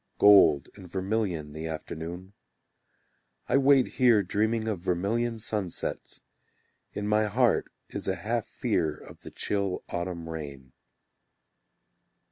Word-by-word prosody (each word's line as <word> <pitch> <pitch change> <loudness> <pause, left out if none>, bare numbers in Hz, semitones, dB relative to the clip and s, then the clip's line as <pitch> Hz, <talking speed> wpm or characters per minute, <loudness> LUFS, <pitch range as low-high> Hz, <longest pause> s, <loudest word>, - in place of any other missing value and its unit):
Gold 80 -9 +6
and 95 -3 -13
vermilion 95 -6 -2
The 80 +2 -6
afternoon. 85 +4 -6 1.1
I - - +3
wait 140 -1 +5
here 115 -5 +6
dreaming 110 +4 0
of 105 -5 -1
vermilion 100 +7 -1
sunsets: 105 -5 -3 0.7
In 105 0 -4
my 105 +1 +3
heart 120 +4 +1 0.2
is - - -5
a 95 - +1
half 110 +6 -2
fear 85 -10 -1
of - - -14
the - - -10
chill 100 -3 -2
autumn 85 -1 -4
rain. 70 -5 -8
95 Hz, 115 wpm, -28 LUFS, 85-110 Hz, 1.1 s, Gold